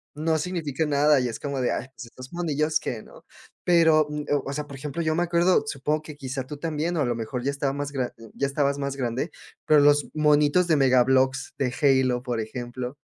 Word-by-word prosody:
no 160 +1 0
significa 160 -5 -2
nada, 145 0 +4
y 125 - 0
es 115 - -6
como 140 -2 -3
de: 125 - +1
"Ay, - - -2
estos 130 +4 -11
monillos, 155 -3 0
¿qué?", 115 -3 -5
¿no? - - -16 0.4
Pero, 160 -3 +5
um, 150 0 -5
ah, 145 - +2
o 135 - -4
sea, 150 +1 -3
por 140 - -9
ejemplo, 150 +4 -4
yo 155 - +1
me 175 - +1
acuerdo, 175 +4 +3
supongo 150 -1 -1
que, 150 -1 -9
quizá, 135 -1 -5
tú 150 - -7
también, 160 +3 -2
o 150 - +1
a - - +2
lo 120 - 0
mejor 115 +2 -4
ya 140 - 0
estaba 140 -1 -2
más 145 0 -4
gra 130 -3 -2 0.2
ya 140 - 0
estabas 140 0 0
más 140 -1 -3
grande, 130 +4 -2 0.4
pero 150 -1 +5
los 145 0 +4
monitos 150 +3 +4
de 160 - +4
Mega 130 -2 +5
Bloks 130 +1 +1
de 130 -3 0 0.3
Halo, 125 -1 0
por 120 -3 -2
ejemplo. 125 +3 -6
145 Hz, 225 wpm, -25 LUFS, 130-155 Hz, 0.4 s, Pero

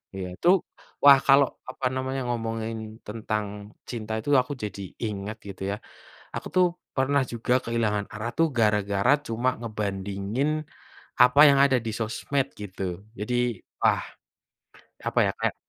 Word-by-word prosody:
iya 95 -1 -4
itu 175 - +2 0.5
wah 140 -1 +9
kalau 140 0 +7 0.2
apa 130 - -5
namanya 130 +1 -2
ngomongin 115 -1 -4
tentang 105 -1 -4
cinta 110 -3 -4
itu 110 - -5
aku 145 - -5
jadi 100 -1 -5 0.2
ingat 105 0 -4
gitu 95 -1 -9
ya. - - -1 0.6
Aku - - -4
tuh 185 - +6 0.3
pernah 135 +1 +2
juga 120 +1 0
kehilangan 110 -3 0
arah 110 +2 -4
tuh 165 - +4
gara-gara 105 +1 +2 0.2
cuma 120 +3 +1
ngebandingin 100 +3 -2 0.7
apa 125 +3 +4
yang 140 -1 +5
ada 135 -2 +4
di 110 - -1
sosmed 115 +5 -1
gitu, 95 0 -5
jadi 115 +4 -2 0.5
wah - - +3 1.1
apa - - -1
ya - - +1
kayak, - - 0
110 Hz, 140 wpm, -26 LUFS, 105-130 Hz, 1.1 s, wah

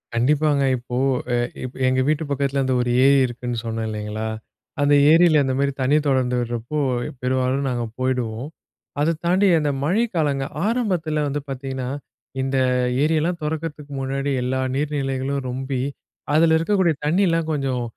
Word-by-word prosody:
கண்டிப்பாங்க. 145 +3 +2
இப்போ 125 0 -5 0.4
எ - - +2 0.5
எங்க 130 0 +2
வீட்டு 155 +1 +1
பக்கத்துல 140 0 0
அந்த 130 - +1
ஒரு 120 - -1 0.2
ஏரி 140 0 +6
இருக்குன்னு 120 0 -5
சொன்னேன் 115 -1 -3
இல்லங்களா, 105 +1 -4 0.5
அந்த 145 0 +4 0.2
ஏரியில 165 -2 +6
அந்த 130 -1 0
மாரி 140 0 +2
தண்ணீர் 145 +3 +2
தொடர்ந்து 125 -2 +1
விடுறப்போ, 120 +4 -3 0.4
பெரும்பாலும் 130 +2 0
நாங்க 120 -2 -2
போயிடுவோம். 125 0 -2 0.5
அத 165 +2 +2
தாண்டி 185 +3 +3
அந்த 145 -1 0
மழை 190 +10 +2
காலங்கள் 140 -4 0
ஆரம்பத்துல 180 -10 0
வந்து 145 +1 -2
பாத்தீங்கன்னா, 130 -1 -4 0.5
இந்த 135 0 -1 0.5
ஏரியெல்லாம் 160 +3 +1
துறக்கத்துக்கு 150 -1 -4
முன்னாடி 135 +1 -2
எல்லா 130 +1 -1 0.2
நீர்நிலைகளும் 140 -2 -2
ரொம்பி 130 0 -3 0.5
அதுல 160 +1 +5
இருக்கக்கூடிய 180 0 +2
தண்ணீயலாம் 165 -1 +2
கொஞ்சம் 135 -4 -1
140 Hz, 135 wpm, -22 LUFS, 130-155 Hz, 0.5 s, ஏரி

